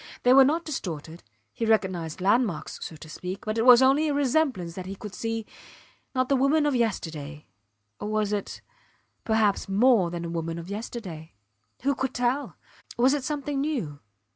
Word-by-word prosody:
They 250 - +6
were 270 0 +9
not 315 +5 +1
distorted 170 - -5 0.3
he - - -4
recognized 190 -7 0
landmarks, 205 -2 +1
so 160 - -6
to 155 - -12
speak; 180 +4 -7
but 215 +1 -1
it 230 - +2
was 250 +1 +9
only 280 +4 +4
a 290 - 0
resemblance 265 - +1
that 185 +1 -7
he 195 - -5
could 205 0 -9
see, 225 +2 -3 0.7
not 255 0 +2
the 275 - +3
woman 280 +4 +3
of 295 - +2
yesterday 160 - -2 0.5
or - - -4
was 215 -1 0
it, 205 -1 -4 0.6
perhaps, 220 -3 +1
more 205 -2 +4
than 170 0 -5
the 170 - -4
woman 165 0 -3
of 170 +3 -8
yesterday? 200 -7 -7 0.5
Who 280 +1 +2
could 265 0 -3
tell? 250 +4 -1 0.4
Was 255 +3 +4
it 290 -3 -1
something 285 0 -2
new? 235 - -3
220 Hz, 175 wpm, -26 LUFS, 175-265 Hz, 0.7 s, were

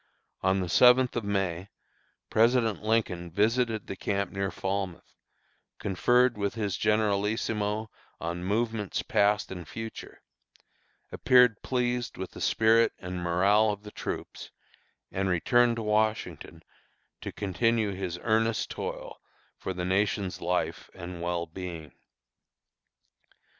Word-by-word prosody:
On 95 +1 +2
the 90 - -2
seventh 125 +7 +5
of 120 - -1
May, 95 -2 -2 0.6
President 115 -1 +3
Lincoln 105 -6 0
visited 110 +4 +1
the 95 - -6
camp 100 +1 -2
near 95 0 -2
Falmouth, 95 -2 -4 0.6
conferred 120 +4 +2
with 100 +1 -1
his 105 -5 -1
generalissimo 105 +1 0 0.3
on 85 +1 -4
movements 110 +1 -1
past 105 -4 +2
and 90 -3 -7
future, 115 0 -8 0.9
appeared 125 -3 +4
pleased 125 -2 -1
with 95 0 -5
the - - -10
spirit 115 +1 +4
and 90 0 -6
morale 100 +5 +3
of 105 0 -4
the 105 - -10
troops, - - -6 0.6
and 95 0 -1
returned 120 +7 +3
to 115 - -4
Washington 105 -6 -1 0.6
to - - -5
continue 105 +2 0
his 95 -3 -4
earnest 115 0 +1
toil - - -6 0.4
for - - -4
the 90 -1 -3
nation's 95 0 0
life 90 +1 -2
and 85 0 -7
well 85 0 -1
being. 85 -3 -7
105 Hz, 120 wpm, -28 LUFS, 90-115 Hz, 0.9 s, seventh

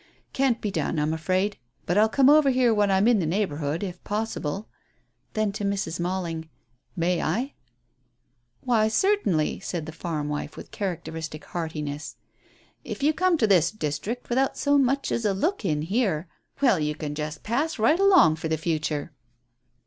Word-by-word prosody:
"Can't 265 -3 +1
be 210 - -2
done, 170 - -1
I'm 150 +1 +1
afraid. 185 +5 0 0.3
But 175 - 0
I'll 215 +2 +5
come 265 +3 +4
over 295 -1 +6
here 250 -3 +3
when 205 -1 +2
I'm 195 +2 +3
in 240 -3 +4
the 165 - 0
neighbourhood, 160 -3 -1
if 180 -2 -6
possible." 205 -3 -3 0.7
Then 215 -2 0
to 205 +1 -5
Mrs. 195 -4 -2
Malling, 170 -3 -3 0.5
"May 175 0 +1
I?" 235 - -1 1.1
"Why, 225 -4 +2
certainly," 220 - +1
said 175 -5 -4
the 160 - -6
farm 155 -2 -4
wife, 150 0 -4
with - - -10
characteristic 160 -5 -5
heartiness. 155 -3 -5 0.7
"If - - -6
you 305 +2 +4
come 365 +1 +2
to 235 - +3
this 180 -6 +4
district 210 +6 -4
without 265 +2 +1
so 285 0 +3
much 275 +1 +1
as 230 - -1
a 205 -2 +1
look 340 - -1
in 150 -5 0
here, 190 -3 0 0.4
well, 235 -10 +5
you 150 0 -1
can 150 -1 -5
just 150 +1 -5
pass 280 +8 -1
right 235 +10 +3
along 370 - +6
for 160 - -3
the 160 0 0
future." 155 -2 -2
190 Hz, 170 wpm, -25 LUFS, 160-235 Hz, 1.1 s, over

